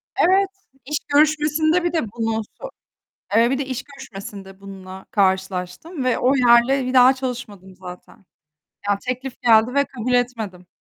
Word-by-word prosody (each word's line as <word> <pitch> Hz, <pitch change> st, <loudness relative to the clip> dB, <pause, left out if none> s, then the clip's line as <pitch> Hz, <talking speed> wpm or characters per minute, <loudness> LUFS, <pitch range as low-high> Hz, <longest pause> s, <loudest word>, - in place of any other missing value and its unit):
Evet, 385 Hz, +2 st, +3 dB, 0.4 s
iş 300 Hz, +2 st, -2 dB, 0.2 s
görüşmesinde 310 Hz, +3 st, +2 dB
bir 345 Hz, -, -1 dB
de 325 Hz, -, +1 dB
bunu, 225 Hz, -1 st, -2 dB
sö -, -, -13 dB, 0.7 s
eee, 235 Hz, +2 st, +4 dB
bir 270 Hz, -, 0 dB
de 280 Hz, -, -2 dB
iş 260 Hz, -2 st, -5 dB
görüşmesinde 200 Hz, -8 st, -11 dB
bununla 190 Hz, -1 st, -11 dB
karşılaştım 190 Hz, -, -1 dB
ve 255 Hz, -, +1 dB
o 260 Hz, +3 st, +2 dB
yerle, 250 Hz, +2 st, +4 dB
bir 255 Hz, -, -3 dB
daha 255 Hz, +1 st, +7 dB
çalışmadım 225 Hz, -8 st, -7 dB
zaten. 185 Hz, +3 st, -12 dB, 0.6 s
Ya, 200 Hz, -1 st, +2 dB
teklif 255 Hz, +1 st, -5 dB
geldi 230 Hz, +1 st, +4 dB
ve 280 Hz, 0 st, +3 dB
kabul 250 Hz, -2 st, -5 dB
etmedim. 220 Hz, -8 st, -2 dB
245 Hz, 150 wpm, -21 LUFS, 200-275 Hz, 0.7 s, daha